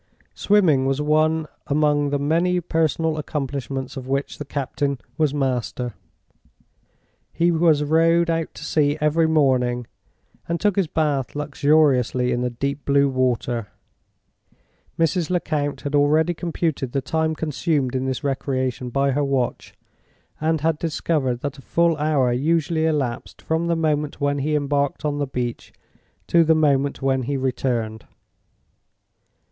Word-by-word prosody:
Swimming 165 Hz, -11 st, +3 dB
was 135 Hz, +1 st, 0 dB
one 155 Hz, +1 st, +2 dB, 0.2 s
among 145 Hz, 0 st, +2 dB
the 145 Hz, -, 0 dB
many 170 Hz, +5 st, +1 dB
personal 160 Hz, -1 st, 0 dB
accomplishments 135 Hz, -2 st, -4 dB
of 130 Hz, -2 st, -7 dB
which 140 Hz, +1 st, -2 dB
the 145 Hz, -, -5 dB
captain 140 Hz, 0 st, -2 dB, 0.2 s
was 155 Hz, -1 st, +1 dB
master. 125 Hz, -3 st, -2 dB, 1.4 s
He 170 Hz, +1 st, +2 dB
was 160 Hz, -3 st, +3 dB
rowed 165 Hz, +3 st, +3 dB
out 165 Hz, -1 st, -1 dB
to -, -, -8 dB
sea 145 Hz, -1 st, +1 dB
every 155 Hz, +2 st, +2 dB
morning, 130 Hz, -6 st, +2 dB, 0.6 s
and 170 Hz, 0 st, -1 dB
took 205 Hz, -3 st, +1 dB
his 195 Hz, -4 st, +1 dB
bath 145 Hz, -5 st, -1 dB
luxuriously 140 Hz, -4 st, +2 dB
in 120 Hz, 0 st, 0 dB
the 125 Hz, -, 0 dB
deep 140 Hz, +4 st, -3 dB
blue 140 Hz, 0 st, +3 dB
water. 125 Hz, -3 st, -1 dB, 1.3 s
Mrs. 165 Hz, +1 st, +1 dB
Lecount 155 Hz, -5 st, -1 dB
had 145 Hz, -, -4 dB
already 150 Hz, +4 st, +3 dB
computed 160 Hz, -6 st, -2 dB
the 135 Hz, -, 0 dB
time 160 Hz, +3 st, -1 dB
consumed 150 Hz, -4 st, -1 dB
in 130 Hz, 0 st, -1 dB
this 130 Hz, +3 st, -3 dB
recreation 130 Hz, -2 st, -2 dB
by 140 Hz, +2 st, +1 dB
her 145 Hz, +2 st, 0 dB
watch, 135 Hz, -3 st, -2 dB, 0.6 s
and 160 Hz, 0 st, 0 dB
had 160 Hz, -1 st, +1 dB
discovered 150 Hz, -6 st, -1 dB
that 145 Hz, -1 st, -4 dB
a -, -, -11 dB
full 170 Hz, +3 st, +2 dB
hour 145 Hz, -4 st, +2 dB
usually 160 Hz, +4 st, +1 dB
elapsed 135 Hz, -7 st, -2 dB
from 160 Hz, +1 st, -1 dB
the 170 Hz, -, +1 dB
moment 150 Hz, -2 st, -1 dB
when 145 Hz, 0 st, 0 dB
he 150 Hz, +2 st, 0 dB
embarked 140 Hz, 0 st, -1 dB
on 145 Hz, -1 st, -1 dB
the 145 Hz, -, -1 dB
beach 125 Hz, -2 st, -4 dB, 0.5 s
to 170 Hz, -1 st, +4 dB
the 160 Hz, 0 st, +4 dB
moment 140 Hz, -3 st, +1 dB
when 135 Hz, -1 st, +1 dB
he 135 Hz, +3 st, -2 dB
returned. 120 Hz, -4 st, -2 dB
145 Hz, 140 wpm, -22 LUFS, 135-160 Hz, 1.4 s, to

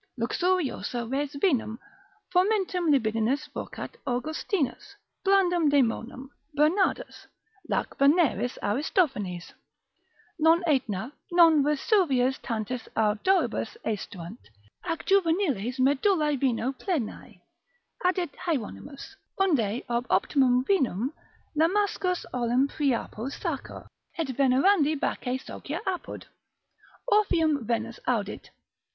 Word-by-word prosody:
Luxuriosa 270 Hz, -3 st, -1 dB
res 275 Hz, +4 st, -2 dB
vinum, 265 Hz, -, +1 dB, 0.6 s
fomentum 370 Hz, -2 st, +2 dB
libidinis 250 Hz, +2 st, +1 dB
vocat -, -, -7 dB
Augustinus, 310 Hz, -, -2 dB, 0.3 s
blandum 355 Hz, -5 st, +3 dB
daemonem, 255 Hz, -1 st, 0 dB, 0.3 s
Bernardus; 370 Hz, +11 st, +1 dB, 0.4 s
lac -, -, -1 dB
veneris, 280 Hz, -3 st, +3 dB
Aristophanes. 210 Hz, -, -1 dB, 0.9 s
Non 325 Hz, +3 st, +4 dB
Aetna, 250 Hz, -, 0 dB, 0.2 s
non 335 Hz, -3 st, +6 dB
Vesuvius 285 Hz, -, +2 dB
tantis 230 Hz, +1 st, -4 dB
ardoribus 220 Hz, -, +1 dB
aestuant, 200 Hz, -1 st, -5 dB, 0.5 s
ac 330 Hz, -2 st, -3 dB
juveniles 330 Hz, -, +1 dB
medullae 295 Hz, +4 st, +2 dB
vino 255 Hz, -1 st, 0 dB
plenae, 275 Hz, -, -4 dB, 0.6 s
addit 360 Hz, -3 st, +1 dB, 0.2 s
Hieronymus: 275 Hz, -1 st, -4 dB, 0.2 s
unde 255 Hz, -, +1 dB
ob 240 Hz, +1 st, -1 dB
optimum 255 Hz, -3 st, +3 dB
vinum 265 Hz, -, +1 dB, 0.4 s
Lamsacus 365 Hz, +2 st, +1 dB
olim 250 Hz, +2 st, +2 dB
Priapo 265 Hz, -4 st, -2 dB
sacer: -, -, -5 dB, 0.3 s
et 325 Hz, -5 st, -2 dB
venerandi 280 Hz, +5 st, +3 dB
Bacchi 255 Hz, -1 st, -2 dB
socia -, -, -6 dB
apud 375 Hz, -2 st, -4 dB, 0.8 s
Orpheum 325 Hz, -, +2 dB
Venus 230 Hz, 0 st, -2 dB
audit. 210 Hz, -5 st, -2 dB
280 Hz, 90 wpm, -27 LUFS, 245-345 Hz, 0.9 s, non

